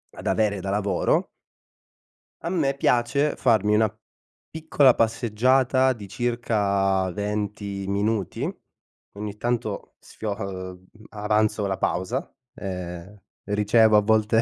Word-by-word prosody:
ad - - -10
avere 105 -2 +1
da 95 +1 -4
lavoro 100 -1 +1 1.2
a 170 - -2
me 155 -7 +1
piace, 140 +2 +1
farmi 105 -3 +3
una 110 -1 +2 0.5
piccola 150 -5 +3
passeggiata 130 +4 +2
di 105 -5 -10
circa 100 -5 0
20 100 0 -3
minuti, 100 0 -1 0.6
ogni 105 0 -6
tanto 120 -3 -3
sfio 110 -1 -6
uhm, 95 -2 -7 0.2
avanzo 105 0 0
la 95 -1 -2
pausa, 105 +9 -2 0.2
ehm, 90 0 -6 0.3
ricevo 105 +2 +3
a - - +5
volte 110 +1 +3
105 Hz, 110 wpm, -24 LUFS, 100-120 Hz, 1.2 s, a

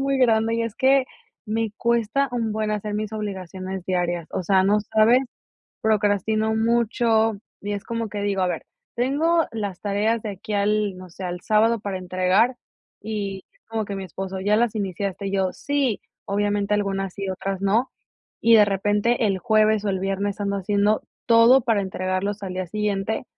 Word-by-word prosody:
muy 275 0 +1
grande, 225 -2 +3
y 230 - 0
es 230 -1 -4
que 265 +1 +4 0.4
me 220 0 -1
cuesta 235 +3 +1
un 225 -3 -1
buen 215 0 -1
hacer 210 0 -2
mis 215 0 -2
obligaciones 190 -2 -5
diarias. 175 -2 -1
O - - -2
sea, 190 +1 +3
no 210 +2 +3
sabes. 220 +4 +4 0.6
Procrastino 215 +1 +1
mucho, 225 0 +2 0.3
y 205 +1 -4
es 200 - -4
como 230 -2 -3
que 205 0 -4
digo: 200 -2 0
"A 185 - +2
ver, 180 - -3 0.3
tengo 310 +7 +2
las 205 -5 -4
tareas 210 +2 0
de 215 - -4
aquí 200 +2 -7
al, 205 -1 +1
no 185 -1 -11
sé, 185 +3 -10
al 180 0 -4
sábado 220 +3 +3
para 200 -2 -4
entregar", 185 +6 +2 0.5
y 200 -3 -4 0.2
como 220 -2 -2
que 200 - -5
mi 195 - -5
esposo: 190 +2 -5
"¿Ya 205 +2 +3
las 235 -1 +1
iniciaste? 200 -1 -3
Y 195 - -3
yo: 190 -2 +1
"Sí". 280 -6 -1 0.2
Obviamente, 205 0 0
algunas 195 -2 -1
sí, 195 -1 -4
otras 195 0 -3
no. 215 +6 +2 0.5
Y 230 0 +6
de 210 -2 +7
repente 205 +4 +1
el 195 -2 0
jueves 215 -1 +3
o - - +1
el 190 -1 -1
viernes 195 +2 -2
ando 200 0 -1
haciendo 205 +2 +1 0.3
todo 235 +3 +7
para 225 -4 +1
entregarlos 190 +2 -2
al 185 - -4
día 185 0 -3
siguiente, 210 +3 -2
205 Hz, 180 wpm, -23 LUFS, 195-225 Hz, 0.6 s, de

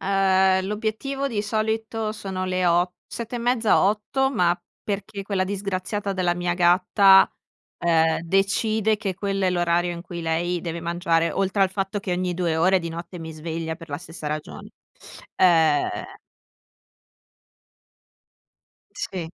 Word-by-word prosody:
Ehm, 190 -1 +3
l'obiettivo 225 +7 -2
di 215 -5 -2
solito 220 +1 -2
sono 190 -3 -4
le 185 0 0
o 175 +1 +2
sette 235 +1 -6
e - - -3
mezza, 235 -2 +2
8:00, 215 +7 +1
ma 175 -7 +2 0.2
perché 200 0 -4
quella 195 -1 -1
disgraziata 200 +1 -3
della 180 -2 0
mia 175 0 -1
gatta, 185 +2 +5 0.5
ehm, 165 -1 +2
decide 205 +4 +1
che 200 -3 -3
quello 195 +1 -2
è 185 - +3
l'orario 175 0 +1
in 170 0 -7
cui 170 -1 -7
lei 170 +2 -1
deve 170 0 -5
mangiare, 170 -1 +1
oltre 195 +1 +1
al 190 - +2
fatto 195 +1 -2
che 190 - -3
ogni 180 0 -1
2 170 -2 0
ore 185 +4 +4
di 170 -2 -5
notte 170 +2 -7
mi 160 -1 -7
sveglia 160 +1 -4
per 165 -1 -12
la 145 -1 -4
stessa 165 -2 -9
ragione. 150 0 -5 0.7
Ehm 160 -5 +2 2.8
Sì. 180 -4 -4
185 Hz, 140 wpm, -24 LUFS, 170-205 Hz, 2.8 s, gatta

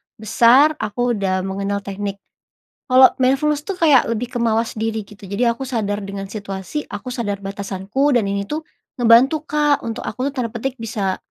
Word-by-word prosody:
besar 240 +7 +5
aku 230 +3 -1
udah 190 -4 -1
mengenal 200 +1 -3
teknik 200 0 -4 0.7
kalau 260 0 +7
mindfulness 285 +3 +1
tuh 395 - -3
kayak 295 -6 +5
lebih 230 +2 -2
kemawas 230 -2 -1
diri 220 0 -2
gitu 205 -1 -13
jadi 235 +5 +1
aku 270 - -5
sadar 210 -5 -2
dengan 195 0 -6
situasi, 200 +7 -5
aku 205 +5 -7
sadar 205 -5 -3
batasanku 200 +7 -1
dan 230 - +3
ini 200 0 -2
tuh, 310 +5 -4 0.3
ngebantu 250 +6 +4
Kak 295 -1 +1
untuk 230 -1 -5
aku 255 +5 -2
tuh - - -11
tanda 235 -2 -1
petik 260 +3 -4
bisa, 200 -4 -2
225 Hz, 170 wpm, -20 LUFS, 200-260 Hz, 0.7 s, kalau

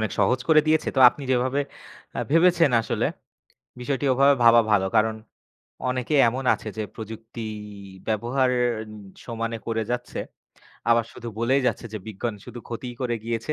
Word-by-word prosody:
অনেক 110 -3 -1
সহজ 125 - +2
করে 155 -1 +7
দিয়েছে। 155 0 +2
তো - - +3
আপনি 140 - -9
যেভাবে 130 +3 +1 0.6
আ - - -3
ভেবেছেন 165 -1 +4
আসলে, 110 - -2 0.8
বিষয়টি 135 +3 -2
ওভাবে 140 +2 +5
ভাবা 115 0 +7
ভালো, 95 -2 +3
কারণ 110 0 +3 0.7
অনেকে 125 +3 -2 0.2
এমন 130 +3 -4
আছে - - -11
যে, 110 - -1
প্রযুক্তি 110 +1 -8 0.6
ব্যবহার 120 +4 +1 0.8
সমানে 115 -1 -3
করে 115 -1 0
যাচ্ছে। 125 0 -4 0.7
আবার 115 0 +4
শুধু 120 - -8
বলেই 130 +4 +2
যাচ্ছে - - -1
যে, 110 - -3
"বিজ্ঞান 110 +2 -4
শুধু 125 -1 -9
ক্ষতিই 120 +1 -6
করে 120 -2 0
গিয়েছে। 115 +5 -2
120 Hz, 150 wpm, -24 LUFS, 115-135 Hz, 0.8 s, করে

